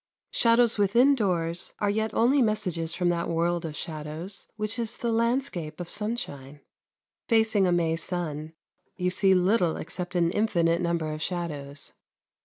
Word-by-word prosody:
Shadows 230 -1 +3
within 235 +8 +5
doors 175 -8 -1
are 205 - 0
yet 220 +1 -1
only 260 +5 +4
messages 185 -8 0
from 180 -1 +1
that 170 -1 -1
world 170 +1 0
of 155 -2 -5
shadows 155 +5 -6
which 215 +2 -2
is 230 0 -3
the 235 - -1
landscape 230 - -1
of 175 -1 -6
sunshine. 150 - -4 0.7
Facing 220 -4 +3
a - - +2
May 165 -2 +2
sun 160 -2 -3 0.4
you 180 -1 -1
see 190 0 +4
little 180 -2 +2
except 180 +2 -4
an 170 -1 +2
infinite 175 -5 +1
number 170 -3 -1
of 155 - -6
shadows. 150 -6 -4
180 Hz, 150 wpm, -27 LUFS, 165-220 Hz, 0.7 s, within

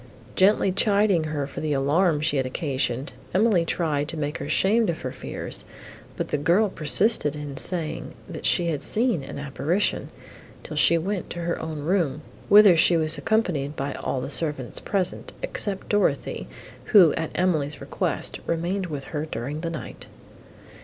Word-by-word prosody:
Gently 195 0 +4
chiding 200 -3 +2
her 150 -2 -2
for 140 - -8
the 155 -1 -1
alarm 150 +4 +2
she 155 -2 +1
had 130 -1 0
occasioned, 130 -2 -2 0.2
Emily 200 -3 +3
tried 150 -4 -1
to 160 - -3
make 150 0 -3
her - - -5
ashamed 215 +2 +2
of 165 - -3
her 130 - -4
fears; - - -4 0.5
but - - -3
the 150 - -1
girl 180 +8 +3
persisted 160 -1 +4
in 145 -2 -6
saying, 165 +1 -2
that - - -3
she 175 - +3
had 155 -4 -1
seen 230 - +1
an 135 - -8
apparition, 140 +7 -1 0.5
till - - -7
she 170 - +4
went 190 +3 -3
to 175 - -5
her 170 0 -2
own 160 -2 -5
room, 155 -3 0 0.3
whither 205 -3 +8
she 170 +1 +4
was 155 -1 +2
accompanied 155 -7 0
by 140 0 -3
all 130 - -3
the 135 - -5
servants 145 -5 -1
present, 190 -3 -3
except 200 - -3
Dorothée, 205 -1 0 0.4
who, 185 -8 +6
at 160 -1 -3
Emily's 155 -5 0
request, - - -2
remained 180 +3 -1
with 145 -4 -5
her 150 +2 -5
during 145 +3 -5
the 170 - -3
night. 165 -2 -8
160 Hz, 165 wpm, -24 LUFS, 145-190 Hz, 0.5 s, whither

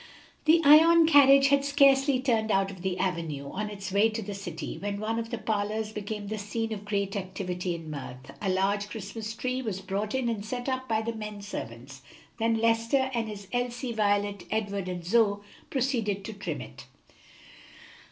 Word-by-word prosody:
The 325 +2 +5
Ion 325 +3 +8
carriage 275 -3 +7
had 280 0 +3
scarcely 275 -1 +4
turned 230 -4 +1
out 195 -1 +2
of 190 -2 -11
the 185 -1 -2
avenue, 165 -7 -2
on 210 +2 -3
its 200 -2 -6
way 205 +3 +4
to 220 0 -4
the 205 +1 -5
city, 185 -5 -6
when 200 0 -3
one 225 +2 -1
of 230 0 -5
the 235 - -3
parlors 215 0 -2
became 210 0 -5
the 215 +1 -4
scene 225 +2 -3
of 205 -1 -7
great 200 -1 -1
activity 180 -2 -3
and 165 -2 -8
mirth. 130 -2 -8
A 200 - -1
large 200 +2 +1
Christmas 220 +1 -6
tree 255 +2 -2
was 215 -6 -3
brought 200 +4 -3
in 260 -2 0
and 225 -3 -2
set 245 +3 -5
up 260 -1 -2
by 220 -1 +1
the 230 +1 -2
men 210 -2 -7
servants; 130 - -7 0.4
then 225 0 +2
Lester 230 +4 +2
and 230 -2 -1
his 205 -2 -8
Elsie, 245 0 -2
Violet, 205 -2 0
Edward 200 -3 -2
and 175 -2 -5
Zoe 205 0 +3 0.3
proceeded 230 -7 -1
to 220 - -5
trim 205 - -5
it. - - -11
210 Hz, 185 wpm, -28 LUFS, 195-235 Hz, 0.4 s, Ion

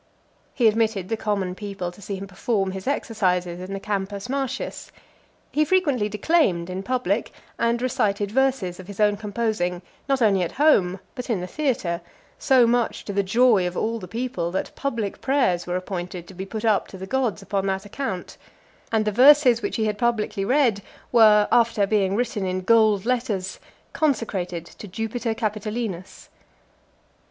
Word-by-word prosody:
He 240 -4 +4
admitted 215 -4 +1
the 225 - 0
common 200 -4 -2
people 195 -3 -5
to 190 - -16
see 200 +1 -4
him 195 +1 -6
perform 195 0 -1
his 190 +2 -7
exercises 180 -10 0
in 185 +1 -7
the 195 - -3
Campus 200 +1 -3
Martius. 270 -1 -3 0.6
He 305 - +2
frequently 290 - +1
declaimed 205 - +1
in 185 +1 -4
public, 240 -2 -1 0.3
and 235 0 +1
recited 215 -6 0
verses 255 -8 0
of 185 - -10
his 200 0 -10
own 210 -1 +4
composing, 205 -4 -2 0.3
not 270 -1 +2
only 205 -5 +3
at 175 - -2
home, 200 -11 +3
but 250 -1 -7
in 220 -5 +1
the 180 - -4
theatre; 190 - -1 0.4
so 255 -3 +5
much 240 0 0
to 200 - -4
the 200 - +2
joy 210 -1 +3
of 180 - -5
all 230 +1 -1
the 185 - -8
people, 225 -5 -3
that 190 +2 -4
public 230 -8 -3
prayers 245 -11 +1
were 180 - -1
appointed 180 -1 -5
to - - -11
be 190 +1 -6
put 220 +2 -5
up 215 -3 +2
to 190 - -10
the 190 - -6
gods 240 -3 -1
upon 195 0 -1
that 190 +1 -2
account; 205 -4 -5 0.5
and 220 -1 +2
the 210 - +1
verses 255 +1 +6
which 205 - -3
had 220 - 0
been 210 -1 0
publicly 215 -3 0
read, 240 -3 +2 0.3
were, 215 -3 +6
after 230 -3 +3
being 195 -2 +1
written 235 -3 -1
in 185 0 -1
gold 215 -1 +4
letters, 230 -7 -1 0.3
consecrated 195 - -1
to 210 - -11
Jupiter 225 +3 -3
Capitolinus. 215 -3 -4
210 Hz, 170 wpm, -24 LUFS, 190-235 Hz, 0.6 s, verses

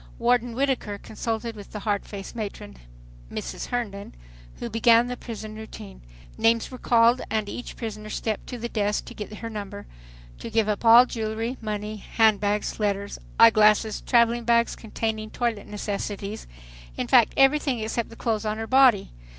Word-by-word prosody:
Warden 245 -1 +1
Whittaker 260 -6 -1
consulted 225 +2 -4
with 205 -2 -12
the 210 - -5
hard 205 -1 -1
faced 200 +1 -8
matron, 200 - -6 0.5
Mrs. - - -5
Herndon, 210 -5 -4 0.4
who - - -5
began 230 +1 +4
the 250 0 -4
prison 220 -3 -8
routine. 215 -2 -10 0.4
Names 230 +2 +2
were 255 - -8
called, 235 +1 +4
and 215 -1 -1
each 245 - -7
prisoner 215 -2 -6
stepped 215 0 -3
to 250 - -6
the 235 0 -4
desk 210 -2 -1
to - - -9
get 210 - -7
her 220 +2 -7
number, 205 -2 -7 0.5
to - - -6
give 225 -1 +1
up 210 +1 -1
all 235 +2 +8
jewelry, 225 +1 -3
money, 215 0 -4
handbags, 210 -1 +1
letters, 200 -1 -2 0.2
eye 230 0 +9
glasses, 215 0 +3
traveling 235 -1 +3
bags 235 0 +2
containing 220 -1 -4
toilet 230 -4 -2
necessities, 205 0 -5 0.5
in - - -1
fact - - +5
everything 270 -1 +3
except 225 +1 -3
the 230 - -12
clothes 225 -2 -1
on 215 0 -2
her 225 - -3
body. 255 -4 +4
220 Hz, 165 wpm, -25 LUFS, 210-235 Hz, 0.5 s, eye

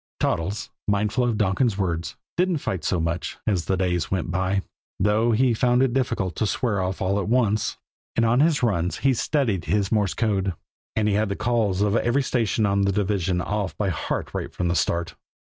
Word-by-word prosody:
Toddles, 95 +6 -1 0.2
mindful 105 +4 +1
of 115 -3 0
Donkin's 100 +2 +1
words, 85 -4 -2 0.2
didn't 180 -1 +2
fight 95 - -3
so 90 +3 0
much 85 +2 -2
as 95 -7 0
the 95 - 0
days 90 -3 0
went 90 -2 -1
by, 95 +2 0 0.4
though 105 +4 +3
he 120 +2 +3
found 125 +2 +3
it 130 -3 +1
difficult 95 -9 -1
to 110 - +1
swear 105 -3 0
off 95 +1 -2
all 100 +2 +1
at 100 - -2
once; 110 -3 +1 0.4
and 115 - +3
on 120 +2 +3
his 155 -2 +3
runs 90 -6 +1
he 135 - +5
studied 115 - 0
his 95 +4 0
Morse 105 -6 +1
code, 100 -5 0 0.4
and 110 -1 +1
he 105 - +2
had 105 +1 +1
the 100 - -1
"calls" 105 -5 +1
of 105 +1 +1
every 125 +5 +1
station 115 -3 +1
on 100 0 +2
the 100 0 +2
division 95 -3 0
off 105 -1 -2
by 100 -2 0
heart 85 - -3
right - - -4
from 90 -1 -2
the 85 - +1
start. 85 0 0
100 Hz, 200 wpm, -24 LUFS, 95-115 Hz, 0.4 s, he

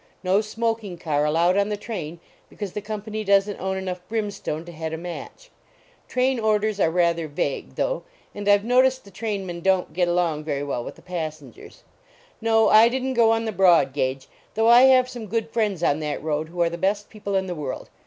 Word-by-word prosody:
No 190 +3 +3
smoking 220 -3 -3
car 150 -3 0
allowed 170 +5 +2
on 200 +1 +2
the 210 - -2
train 175 -7 -6 0.3
because 205 -4 -7
the 210 - -4
company 215 +1 -5
doesn 200 0 +3
t - - -16
own 190 0 -2
enough 185 -1 -4
brimstone 205 -7 -3
to 175 - -9
head 160 -1 -5
a - - -3
match. 180 - -9 0.6
Train 255 0 +1
orders 215 -1 +1
are 165 - +3
rather 170 -1 +1
vague, 145 -1 -3
though; - - -1 0.3
and 205 0 -3
I 205 - +7
ve 205 +2 -9
noticed 260 +1 +3
the 200 - -14
trainmen 190 -4 -4
don 190 0 +2
t - - -23
get 180 -1 +1
along 170 -3 0
very 145 -2 -2
well 130 -4 -3
with - - -8
the - - -18
passengers. 155 -7 -7 0.6
No, 225 -1 +3
I 220 +2 +7
didn 260 +1 -2
t - - -1
go 235 -2 +4
on 225 0 +1
the 220 - -1
broad 175 -9 +4
gauge, 130 -1 -2 0.3
though 225 +1 +2
I 240 +2 +8
have 255 -1 +5
some 240 -3 -8
good 225 +2 -2
friends 210 -7 -1
on 145 -2 +2
that 150 -1 -4
road 155 0 -2
who 175 0 0
are 170 - +1
the 170 - -6
best 200 +3 -1
people 200 -2 -4
in 190 0 +1
the 180 - -4
world. 145 -6 -6
195 Hz, 220 wpm, -24 LUFS, 165-220 Hz, 0.6 s, I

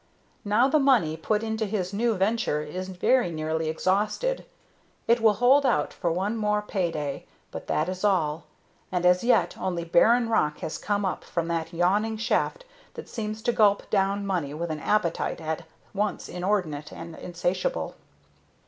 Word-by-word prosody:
Now 215 +5 +3
the 305 +3 +3
money 245 - +3
put 210 +7 -1
into 220 -1 -2
this 195 -2 -2
new 230 +2 +1
venture 195 -6 0
is 185 +5 -6
very 225 +5 +2
nearly 160 0 -2
exhausted. 210 - 0 0.6
It 235 +1 +4
will 220 -2 +5
hold 255 +6 +5
out 150 - +1
for 170 - -1
one 195 +7 -1
more 210 -1 0
pay 190 -4 -1
day, 145 -4 -4 0.2
but - - -7
that 155 - 0
is 185 +1 -5
all. 165 -6 +1 0.5
And 180 -1 -1
as 180 +2 +4
yet 245 - +3
only 175 -2 -2
barren 230 +8 +4
rock 150 -9 +1
has 155 - -4
come 205 -1 -1
up 185 - -2
from 170 -1 -3
that 165 -1 -2
yawning 200 +6 +1
shaft 260 - -1 0.3
that - - -9
seems 215 -1 -5
to 240 - +2
gulp 205 -3 +3
down 200 0 +1
money 170 -7 -2
with 170 +1 -3
an 155 - -3
appetite 205 -1 0
at 160 +1 -4 0.3
once 210 +1 -2
inordinate 175 -6 -2
and 170 -1 -9
insatiable. 180 - -2
195 Hz, 165 wpm, -26 LUFS, 165-220 Hz, 0.6 s, will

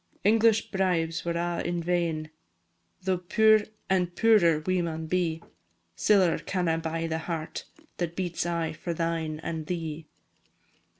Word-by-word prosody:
English 220 +1 +3
bribes 165 -4 0
were 170 0 -1
a' 175 0 -1
in 175 0 -1
vain, 165 -3 -1 0.7
Tho' 185 -1 0
puir, 215 +4 +4 0.2
and 180 -2 +1
puirer, 175 -9 +4
we 185 -1 +1
maun 160 -1 -3
be; 165 -1 -1 0.5
Siller 190 - +3
canna 175 -3 -1
buy 165 0 -2
the 160 0 -2
heart 165 -1 -5 0.3
That 170 -1 -3
beats 180 -3 -2
aye 165 -2 -1
for 170 +2 -4
thine 165 -2 -2
and 160 -2 -4
thee. 160 -3 -4
170 Hz, 135 wpm, -27 LUFS, 165-185 Hz, 0.7 s, puir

